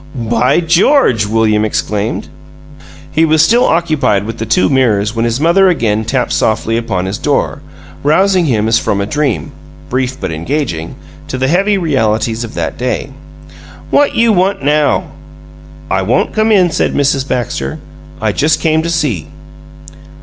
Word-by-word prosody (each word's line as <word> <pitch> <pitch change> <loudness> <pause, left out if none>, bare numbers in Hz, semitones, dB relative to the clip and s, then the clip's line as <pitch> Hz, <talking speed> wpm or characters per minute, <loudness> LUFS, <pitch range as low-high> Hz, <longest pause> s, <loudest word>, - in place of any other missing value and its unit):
"By 120 +5 +1
GEORGE!" 170 - +3
William 110 0 +1
exclaimed. 105 0 -2 0.8
He 160 - +2
was 155 -1 +4
still 240 +2 +3
occupied 155 - +1
with 115 +2 -7
the 110 - -4
two 180 - +2
mirrors 110 -6 +1
when 115 0 0
his 120 +2 -1
mother 175 +5 +4
again 110 -10 0
tapped 130 +1 -1
softly 110 +1 0
upon 95 -6 -2
his 95 +2 -4
door, - - -1 0.4
rousing 185 +4 +2
him 110 -6 0
as 115 0 +3
from 100 - -1
a 100 - -1
dream 115 - -2 0.4
(brief 130 +1 -2
but - - -4
engaging) 85 - -3 0.3
to 130 - -4
the 130 +1 0
heavy 195 +6 +2
realities 115 - 0
of 115 - -8
that 85 -2 -4
day. 125 +2 -2 0.8
"What 290 0 +2
you 230 -1 +3
want 190 -3 0
now?" 150 +1 +1 0.8
"I 95 - +1
won't 110 +7 0
come 215 0 +1
in," 185 -5 +4
said - - -1
Mrs. 140 -1 +1
Baxter. 105 - -3 0.4
"I - - 0
just 155 +1 +1
came 160 -1 +1
to 165 - -3
see." 145 - -1
130 Hz, 155 wpm, -13 LUFS, 110-165 Hz, 0.8 s, was